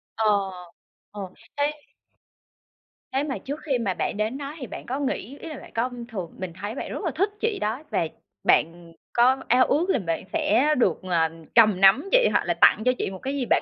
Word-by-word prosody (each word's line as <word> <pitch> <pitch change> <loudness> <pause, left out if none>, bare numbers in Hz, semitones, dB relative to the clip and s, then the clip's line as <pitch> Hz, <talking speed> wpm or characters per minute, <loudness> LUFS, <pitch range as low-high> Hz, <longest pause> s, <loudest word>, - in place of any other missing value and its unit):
Ờ, 205 -3 +2 0.6
ờ. 205 -1 -7 0.4
Thế 290 +1 +2 1.4
thế 270 +2 +1
mà 275 -3 -3
trước 285 +3 -6
khi 275 -5 +1
mà 200 -6 -1
bạn 205 - -2
đến 220 +5 -1
đó 285 +1 -6
thì 255 - -6
bạn - - -8
có 265 +3 -3
nghĩ 275 -1 -3
ý 330 - -8
là 305 - -7
bạn - - -13
có 235 +3 +1 0.2
thường 185 -7 -5
mình 185 -3 -5
thấy 205 +3 -4
bạn - - -5
rất - - -5
là 330 - 0
thích 395 +5 +2
chị 445 -2 0
đó 225 +7 -2
và 165 - 0 0.4
bạn 165 0 +1 0.2
có 250 +3 +5
ao 250 +2 +5
ước 340 +6 +1
là 270 - +3
bạn 165 -3 -2
sẽ 275 +8 +3
được, 240 - +2
à, 165 -2 +3 0.3
cầm 215 -5 +6
nắm 260 - +6
chị, - - +5
hoặc - - +2
là - - +1
tặng 220 - +6
cho 255 - +5
chị - - -2
một 190 - -8
cái 270 - -3
gì 260 -3 -1
bạn - - +3
245 Hz, 220 wpm, -25 LUFS, 200-285 Hz, 1.4 s, cầm